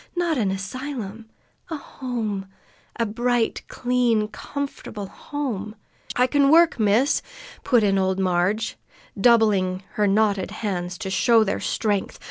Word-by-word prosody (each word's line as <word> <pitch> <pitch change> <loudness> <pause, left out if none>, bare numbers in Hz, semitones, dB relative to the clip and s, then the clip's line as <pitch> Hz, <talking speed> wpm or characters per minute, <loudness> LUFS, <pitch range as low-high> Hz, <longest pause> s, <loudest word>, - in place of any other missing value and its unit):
"Not 345 -2 +1
an 205 -4 +1
asylum, 220 +2 -5 0.4
A 320 - -3
home 225 -9 -4 0.5
a 230 - 0
bright, 240 +2 0
clean, 245 -4 +1
comfortable 215 -3 -6
home 215 -3 -5 0.2
" - - -11
"I 250 - +4
can 280 +1 +3
work, 330 -3 +5
miss!" 220 +7 +3 0.4
put 240 -4 +3
in 195 -1 +3
old 190 0 +1
Marg, 185 +3 +1 0.5
doubling 200 -4 +3
her 210 -1 +1
knotted 200 -1 +2
hands 180 -4 -3
to 195 -4 -5
show 230 +2 +4
their 200 -1 -1
strength. 205 -3 -1
215 Hz, 130 wpm, -23 LUFS, 195-250 Hz, 0.5 s, work